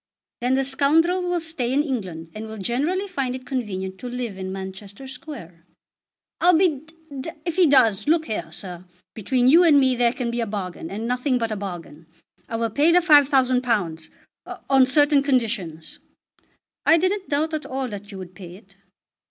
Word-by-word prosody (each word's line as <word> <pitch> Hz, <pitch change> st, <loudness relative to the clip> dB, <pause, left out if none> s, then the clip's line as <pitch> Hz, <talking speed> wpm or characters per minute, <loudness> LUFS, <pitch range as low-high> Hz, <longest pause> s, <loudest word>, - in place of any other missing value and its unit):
"Then 250 Hz, +2 st, +1 dB
the 270 Hz, -, +1 dB
scoundrel 310 Hz, +7 st, +2 dB
will 355 Hz, -1 st, -1 dB
stay 320 Hz, -7 st, -3 dB
in 285 Hz, +3 st, +2 dB
England, 185 Hz, -, -5 dB
and 220 Hz, +1 st, -7 dB
will 220 Hz, 0 st, -8 dB
generally 290 Hz, -, -1 dB
find 275 Hz, -9 st, -3 dB
it 255 Hz, 0 st, -9 dB
convenient 190 Hz, -8 st, -4 dB
to 250 Hz, -, -7 dB
live 240 Hz, -4 st, -4 dB
in 190 Hz, 0 st, -6 dB
Manchester 195 Hz, +5 st, -8 dB
Square." 260 Hz, -, -10 dB, 0.8 s
"I'll 355 Hz, -1 st, +5 dB
be 365 Hz, +1 st, +4 dB
d 315 Hz, +2 st, -9 dB, 0.3 s
d 295 Hz, -, -5 dB, 0.2 s
if 340 Hz, -2 st, -2 dB
he 365 Hz, -3 st, +5 dB
does. 230 Hz, -6 st, +3 dB
Look 320 Hz, +1 st, +3 dB
here, 220 Hz, -, -4 dB
sir. 180 Hz, -2 st, -8 dB, 0.3 s
Between 245 Hz, +4 st, 0 dB
you 330 Hz, +7 st, +7 dB
and 305 Hz, -4 st, +6 dB
me 260 Hz, -2 st, +3 dB
there 240 Hz, -1 st, +2 dB
can 240 Hz, -1 st, -3 dB
be 240 Hz, 0 st, -2 dB
a 230 Hz, -, -2 dB
bargain, 185 Hz, -5 st, -5 dB
and 220 Hz, +4 st, -4 dB
nothing 250 Hz, +2 st, 0 dB
but 230 Hz, -2 st, -2 dB
a -, -, -1 dB
bargain. 175 Hz, -5 st, -8 dB, 0.4 s
I 230 Hz, -, -3 dB
will 230 Hz, 0 st, -1 dB
pay 295 Hz, +8 st, +3 dB
the 345 Hz, -, +5 dB
£5000, 255 Hz, -, +3 dB, 0.6 s
on 265 Hz, -1 st, +6 dB
certain 290 Hz, +1 st, +4 dB
conditions." 225 Hz, -, -2 dB, 0.8 s
"I 330 Hz, -, +5 dB
didn't 375 Hz, +3 st, -1 dB
doubt 310 Hz, +2 st, 0 dB
at 310 Hz, -, -3 dB
all 265 Hz, 0 st, -3 dB
that 205 Hz, 0 st, -8 dB
you 195 Hz, -, -8 dB
would 185 Hz, -1 st, -9 dB
pay 180 Hz, -2 st, -11 dB
it." 195 Hz, 0 st, -19 dB
250 Hz, 185 wpm, -23 LUFS, 200-290 Hz, 0.8 s, you